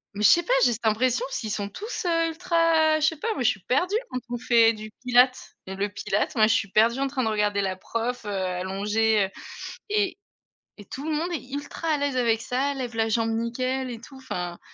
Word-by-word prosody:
Mais 210 - -3
je - - +8
sais 345 - +5
pas, - - 0
j'ai 240 - +3
cette 230 - -7
impression 245 +3 +2
s'ils 220 -5 -4
sont 200 -1 -3
tous, 410 - -6
heu, 330 -1 +2
ultra, 325 -2 +2
je 305 - +2
sais 320 0 +2
pas, 450 +7 -2
moi 255 - -2
je - - +5
suis 195 - -2
perdue 355 - 0
quand 255 - -3
on 240 - -1
fait 235 -2 +4
du 215 0 -8 0.2
Pilates, 250 +1 +3 0.2
heu, 190 - -5
le 200 +1 -1
Pilates, 205 0 -2
moi 215 -1 +5
je 225 - +3
suis 200 -2 -1
perdue 230 +4 +3
en 275 - +1
train 265 -2 -2
de 220 - +1
regarder 210 -1 +1
la 190 -1 -1
prof, 230 +4 -4
heu, 205 - -4
allongée, 195 +3 0
heu 190 - -7 0.6
et 410 -2 0 0.6
et 205 - -10
tout 275 +8 -8
le 320 - -2
monde 335 +4 -1
est 275 -5 -5
ultra 290 +3 -5
à 310 - +3
l'aise 285 -2 -1
avec 230 -3 +2
ça, 265 +4 -1
lève 250 -3 -5
la 225 0 +1
jambe 225 +1 +1
nickel 255 +3 -2
et 230 - -7
tout, 265 +4 -13
enfin 180 -10 -5
240 Hz, 235 wpm, -25 LUFS, 215-285 Hz, 0.6 s, je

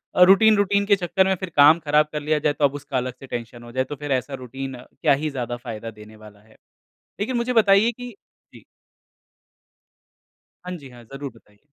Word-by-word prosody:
अ, - - +2
routine 205 +3 +6
routine 200 0 +2
के 200 -1 +4
चक्कर 185 +1 +1
में 190 - +2
फिर 185 0 -6
काम 150 +3 +7
ख़राब 150 0 +2
कर 150 -1 -4
लिया 150 0 0
जाए 145 0 +1
तो 145 0 +1
अब 140 - +1
उसका 140 -2 -4
अलग 125 0 -2
से 135 - -11
टेंशन 120 0 -7
हो 120 - -11
जाए 130 +1 0
तो 145 +3 -7
फिर 145 0 -6
ऐसा 130 +1 -1
रूटीन 135 +1 -6
क्या - - 0
ही 155 - 0
ज़्यादा 120 -3 -4
फ़ायदा 115 -2 -7
देने 105 0 -14
वाला 105 -1 -15
है। 110 +1 -23 0.7
लेकिन 245 +5 -1
मुझे 235 +1 -1
बताइए 220 0 +4
कि 245 0 -9 0.4
जी। - - -15 2.0
हाँ 180 - -6
जी, 140 -4 -12
हाँ, 120 -1 -14
ज़रूर 135 +3 -8
बताइए। 105 +3 -25
145 Hz, 210 wpm, -23 LUFS, 125-185 Hz, 2.0 s, काम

